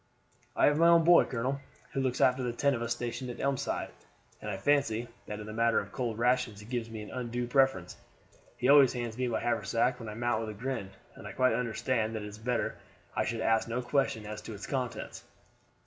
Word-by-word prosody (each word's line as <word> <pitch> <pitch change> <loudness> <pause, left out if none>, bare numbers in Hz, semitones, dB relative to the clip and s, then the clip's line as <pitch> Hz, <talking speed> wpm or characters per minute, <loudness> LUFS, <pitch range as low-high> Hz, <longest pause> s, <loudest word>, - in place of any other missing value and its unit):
"I - - +4
have 145 +1 +3
my 165 - +6
own 170 -1 +6
boy, 170 +1 +7
colonel, 130 +3 -2 0.3
who 135 - 0
looks 130 -1 -1
after 130 +1 +4
the 120 -2 -2
ten 140 +3 +2
of 120 - -3
us 120 0 -3
stationed 120 +2 -3
at 120 - -7
Elmside, 140 -2 -1 0.5
and 105 - -5
I 100 - -3
fancy 120 -1 +1 0.2
that 105 0 -5
in 105 - -7
the 110 - -7
matter 115 +1 +3
of 100 - -7
cold 120 -3 -3
rations 120 -3 +1
he 105 - -11
gives 120 0 -3
me 110 -1 -6
an 105 - -10
undue 120 -1 -3
preference. 125 -8 +1 0.6
He 125 - 0
always 140 -2 +7
hands 120 -3 -4
me 125 +1 -1
my 120 - 0
haversack 115 +2 0
when 115 -3 -7
I 105 - -7
mount 120 -1 0
with 110 -1 -4
a 105 -2 -8
grin, 130 -6 -3 0.2
and - - -10
I - - -7
quite 130 0 +3
understand 115 -1 -1
that 110 - -4
it 105 - -6
is 105 +1 -11
better 120 +1 -1 0.4
I - - +1
should 115 0 -2
ask 110 0 +2
no 120 +2 -2
questions 120 -4 0
as 105 0 -6
to 110 - -8
its 100 - -7
contents." 125 -5 -4
120 Hz, 230 wpm, -30 LUFS, 110-130 Hz, 0.6 s, boy